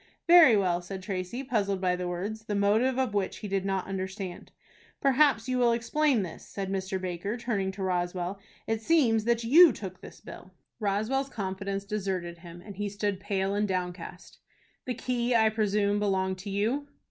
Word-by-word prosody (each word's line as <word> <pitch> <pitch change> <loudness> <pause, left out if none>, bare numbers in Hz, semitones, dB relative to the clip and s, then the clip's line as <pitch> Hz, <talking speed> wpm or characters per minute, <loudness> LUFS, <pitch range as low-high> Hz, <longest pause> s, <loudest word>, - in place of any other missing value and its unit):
"Very 335 -10 +8
well," 180 -3 +1
said 190 +1 -7
Tracy, 190 +6 -4
puzzled 200 -6 0
by 180 -1 +1
the 180 0 -4
words, 205 +5 -4
the 210 - -2
motive 220 +6 +2
of 260 -5 0
which 200 -2 -1
he 210 - -6
did 195 -1 -1
not 195 -1 -1
understand. 190 -1 -5 0.5
"Perhaps 275 -4 +3
you 255 -1 0
will 240 -1 +4
explain 245 0 +1
this," 170 - -8
said 195 -1 -5
Mr. 190 0 -2
Baker, 185 +4 -3
turning 210 -6 -1
to 195 0 -5
Roswell. 180 +1 -2 0.3
"It 225 0 -1
seems 225 -6 +3
that 235 0 +1
you 315 +8 +8
took 190 -5 -8
this - - -12
bill." 185 +1 -12 0.2
Roswell's 220 +7 0
confidence 195 -2 -4
deserted 190 -5 -3
him, 175 0 -11
and 200 -3 -10
he 205 0 -2
stood 200 -1 -2
pale 195 -1 -1
and 205 +1 0
downcast. 180 -1 -5 0.5
"The 250 - -3
key 245 0 -1
I 220 -1 +5
presume, 205 -1 +1
belonged 190 -2 0
to 200 +2 -7
you." 225 +9 -1
200 Hz, 180 wpm, -28 LUFS, 190-230 Hz, 0.5 s, Very